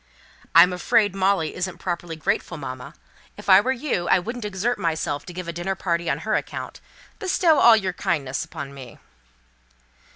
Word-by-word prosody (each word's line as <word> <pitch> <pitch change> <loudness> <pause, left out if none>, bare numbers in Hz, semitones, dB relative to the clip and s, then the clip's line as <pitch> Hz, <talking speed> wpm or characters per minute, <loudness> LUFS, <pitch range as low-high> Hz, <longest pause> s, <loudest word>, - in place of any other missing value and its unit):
"I'm 180 - +8
afraid 205 +3 +2
Molly 190 -4 +1
isn't 180 -1 -4
properly 170 -1 -4
grateful, 175 +1 -2
mamma. 130 +1 -8 0.4
If 205 - -8
I 190 +1 +8
were 255 - 0
you, 250 - -2
I - - +5
wouldn't 230 +5 -5
exert 210 +4 -2
myself 160 -4 -2
to - - -6
give 180 0 -6
a 170 - -4
dinner 175 +3 -3
party 170 -3 -1
on 140 - 0
her 215 - 0
account. - - -4 0.4
Bestow 355 -6 +3
all 230 -2 +7
your 190 -3 -2
kindness 150 -9 -2
upon 140 -1 -8
me." 130 -4 -11
180 Hz, 170 wpm, -23 LUFS, 165-205 Hz, 0.4 s, I'm